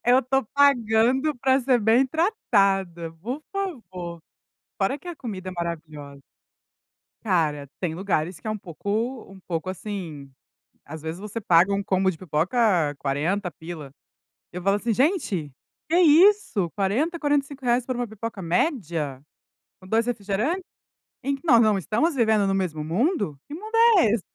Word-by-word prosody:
eu 250 +2 +5
tô 270 +2 +1
pagando 265 +1 +3
p - - -21
ra 260 +1 +5
ser 255 -1 +3
bem 225 +5 +4
tratada, 195 - +1
por 255 +8 -4
favor. 185 - -5 0.6
Fora 230 +9 +1
que 325 - -17
a 350 - -5
comida 200 -9 -6
é - - -8
maravilhosa. 155 -5 -6 1.0
Cara, 155 -8 0
tem 170 -4 -2
lugares 180 -2 -1
que - - -13
é - - -1
um 215 - -3
pouco 215 +8 -4
um 195 -1 -13
pouco, 170 +1 -3
assim 175 -8 -7 0.6
às 155 +2 -8
vezes 160 +2 -5
você 210 +2 -5
paga 185 -2 +4
um 200 0 -1
combo 190 -1 +2
de 170 - -4
pipoca 175 - +1
R$40 170 +8 -1
pila. 160 -5 -9 0.6
Eu 180 - -6
falo 195 +2 +2
assim: 225 +2 -1
"Gente, 230 - 0 0.4
que 330 - +2
isso, 340 - +5
R$40, 240 - 0
R$45, 275 -4 0
por 255 - -3
uma 245 0 -2
pipoca 220 -1 -6
média, 170 - -1 0.6
com - - -14
2 225 +3 +2
refrigerante? 240 - -1 0.6
Em 275 +2 0
que 275 - -15
nós 240 -8 +6
não 215 -3 +3
estamos 235 - 0
vivendo 220 -5 +3
no 195 - +1
mesmo 170 -6 -2
mundo. 205 - 0
Que - - -7
mundo 430 +8 -6 0.2
é 355 - +5
esse? 220 -4 0
205 Hz, 160 wpm, -24 LUFS, 175-260 Hz, 1.0 s, nós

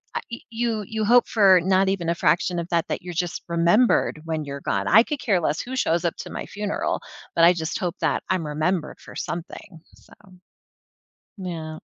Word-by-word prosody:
uh, - - -1
y 235 - -5
you, 230 -2 -1
you 220 -1 -2
hope 245 +3 +5
for 195 -5 +5
not 190 +2 +3
even 180 -4 -1
a 170 - +1
fraction 175 +1 +1
of 170 - -4
that, 170 -1 +1
that - - -2
you're 175 0 -7
just 175 0 -3
remembered 170 +1 +3
when 160 -2 -3
you're 140 0 -6
gone. - - -1
I 220 +4 +7
could 295 +1 -4
care 210 -7 +1
less 155 -1 0
who 255 +1 -6
shows 175 -8 +1
up 170 - 0
to - - -7
my - - -5
funeral, 205 0 -2 0.3
but 165 - +4
I 170 +1 +8
just 160 -2 -3
hope 175 -1 -3
that - - 0
I'm 185 -4 0
remembered 155 +2 -1
for - - -13
something, 170 0 -6
so. - - -20 1.3
Yeah. 165 -4 -6
180 Hz, 200 wpm, -24 LUFS, 165-210 Hz, 1.3 s, I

